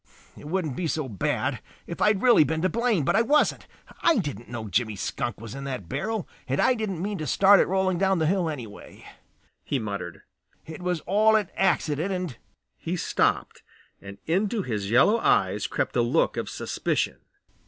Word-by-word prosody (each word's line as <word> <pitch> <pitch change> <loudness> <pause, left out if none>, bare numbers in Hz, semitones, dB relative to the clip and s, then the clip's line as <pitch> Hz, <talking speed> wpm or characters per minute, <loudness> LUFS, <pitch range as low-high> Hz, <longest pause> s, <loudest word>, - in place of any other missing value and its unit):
"It - - -11
wouldn't 160 -5 -2
be 180 - -2
so 155 -2 -2
bad 105 -7 -2 0.2
if 170 - -7
I - - +4
had 210 -2 +2
really 245 -10 +6
been 160 +2 -2
to 185 - +3
blame, 230 - +1
but - - +2
I 220 - +5
wasn't. 295 +6 +2 0.3
I 335 - +4
didn't 145 - -4
know 115 -2 -5
Jimmy 110 +2 0
Skunk 120 +4 -4
was 115 -1 -8
in 140 - -7
that 130 -10 -5
barrel 215 - -3 0.2
and 135 +2 -1
I 255 - +4
didn't 200 -7 -3
mean 205 -1 -3
to 155 - -4
start 195 +7 +6
it - - +3
rolling 185 -1 0
down 190 -1 +2
the 160 - +1
hill 175 0 +1
anyway," 120 -9 -9 0.6
he 140 - -1
muttered. 100 -7 -5 0.4
"It 160 +2 -9
was 180 -3 -1
all 215 +4 +3
an 210 -4 +1
accident 165 -2 +1
and 180 -8 -3 0.2
" - - -54
He - - 0
stopped - - 0 0.4
and 100 0 -10
into 200 +5 0
his 105 - -3
yellow 205 - +4
eyes - - +2
crept - - -2
a - - +3
look - - +1
of - - -3
suspicion. - - -2
170 Hz, 195 wpm, -26 LUFS, 125-200 Hz, 0.6 s, really